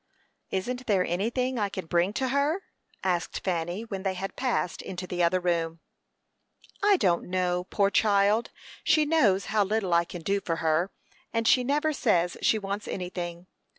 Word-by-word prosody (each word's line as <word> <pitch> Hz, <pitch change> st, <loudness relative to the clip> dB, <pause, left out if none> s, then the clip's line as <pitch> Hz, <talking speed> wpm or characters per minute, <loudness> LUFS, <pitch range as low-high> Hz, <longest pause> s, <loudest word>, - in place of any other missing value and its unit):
"Isn't 250 Hz, +7 st, -3 dB
there 190 Hz, -4 st, +3 dB
anything 240 Hz, +8 st, -1 dB
I 205 Hz, -1 st, 0 dB
can 190 Hz, -2 st, -5 dB
bring 175 Hz, +3 st, +1 dB
to 260 Hz, +3 st, -1 dB
her?" 290 Hz, +8 st, +1 dB, 0.4 s
asked 180 Hz, -2 st, -1 dB
Fanny, 175 Hz, +2 st, -2 dB
when 195 Hz, -4 st, -5 dB
they 190 Hz, -1 st, -1 dB
had 195 Hz, +1 st, -5 dB
passed 250 Hz, -9 st, -1 dB
into 185 Hz, -1 st, -6 dB
the 180 Hz, -1 st, -3 dB
other 175 Hz, +2 st, +3 dB
room. 165 Hz, -2 st, -1 dB, 1.0 s
"I 410 Hz, -1 st, +5 dB
don't 175 Hz, -, +1 dB
know. 180 Hz, -1 st, 0 dB
Poor 200 Hz, +1 st, +1 dB
child! 205 Hz, +2 st, +3 dB, 0.3 s
she 310 Hz, -1 st, +4 dB
knows 225 Hz, -12 st, +3 dB
how 210 Hz, -1 st, +4 dB
little 200 Hz, -2 st, 0 dB
I 170 Hz, 0 st, +4 dB
can 175 Hz, -1 st, -8 dB
do 200 Hz, +3 st, 0 dB
for 165 Hz, -3 st, -1 dB
her, 165 Hz, +3 st, +1 dB, 0.4 s
and 230 Hz, 0 st, 0 dB
she 250 Hz, -, +5 dB
never 295 Hz, +4 st, +1 dB
says 180 Hz, -10 st, +1 dB
she 220 Hz, -, +3 dB
wants 200 Hz, +1 st, -4 dB
anything. 180 Hz, -1 st, -5 dB
195 Hz, 170 wpm, -27 LUFS, 175-230 Hz, 1.0 s, I